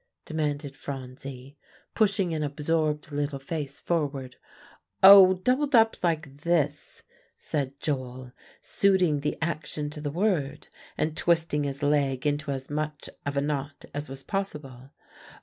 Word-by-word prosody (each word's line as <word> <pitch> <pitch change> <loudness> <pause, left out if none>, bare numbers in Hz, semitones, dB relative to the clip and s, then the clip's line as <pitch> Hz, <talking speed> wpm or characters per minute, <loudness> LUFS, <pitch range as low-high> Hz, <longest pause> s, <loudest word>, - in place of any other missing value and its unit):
demanded 145 -3 -2
Phronsie, 135 0 -8 0.4
pushing 200 -5 +2
an 155 - -2
absorbed 150 +1 -1
little 145 0 -2
face 140 0 -5
forward. 140 -6 -2 0.7
"Oh! 190 -1 +10
doubled 255 +9 +1
up 225 -1 +5
like 160 -5 -1
this," 150 -3 -1 0.3
said 140 -2 -3
Joel, 130 -3 -4 0.3
suiting 185 -7 +2
the 145 - -2
action 155 -2 -3
to 150 - -8
the 145 - -2
word, 155 -4 -1 0.3
and 155 0 -1
twisting 165 -3 +1
his 140 +1 -4
leg 140 -2 +1
into 145 0 0
as 135 -1 -3
much 150 0 -4 0.2
of 140 0 -2
a - - +3
knot 145 0 -3
as 145 0 -5
was 135 0 -8
possible. 145 -10 -5
150 Hz, 130 wpm, -27 LUFS, 140-165 Hz, 0.7 s, Oh